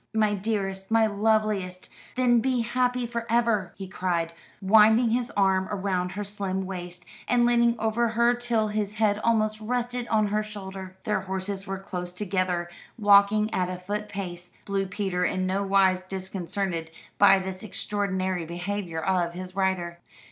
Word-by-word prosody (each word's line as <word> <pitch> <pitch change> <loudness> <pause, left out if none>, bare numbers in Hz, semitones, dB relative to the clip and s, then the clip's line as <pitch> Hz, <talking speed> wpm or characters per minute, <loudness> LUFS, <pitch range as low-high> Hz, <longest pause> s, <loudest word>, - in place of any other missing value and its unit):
"My 215 -1 +3
dearest, 195 -2 -2
my 225 0 +4
loveliest, 210 -3 0 0.3
then 245 -2 +4
be 255 +1 +1
happy 250 +1 0
for 235 0 -4
ever!" 230 -5 +2
he 195 - -6
cried, 175 -3 -1 0.3
winding 220 +4 +5
his 240 +1 0
arm 190 -1 +3
round 185 -3 -2
her 205 - -3
slim 195 -2 -3
waist, 180 -1 -7 0.2
and 240 -1 +3
leaning 235 0 +3
over 225 +2 +1
her 235 +2 +3
till 240 -3 0
his 210 -1 -2
head 210 -1 +2
almost 215 -1 +1
rested 245 +1 -2
on 215 -2 +2
her 210 +1 +1
shoulder. 190 -3 -8
Their 210 -2 0
horses 190 +1 -4
were 195 0 -3
close 180 -2 -6
together, 185 -2 -1 0.3
walking 205 0 +5
at 180 -1 0
a 185 - -4
foot 205 +3 -4
pace, 180 -3 -6 0.2
Blue 195 -1 -1
Peter 190 -2 -2
in 185 +1 0
nowise 190 -1 +2
disconcerted 185 -2 -4 0.3
by 195 -1 +7
this 190 0 -5
extraordinary 190 -4 -2
behaviour 175 0 -4
of 175 -1 0
his 185 0 -7
rider. 185 -3 -1
200 Hz, 155 wpm, -26 LUFS, 185-220 Hz, 0.3 s, by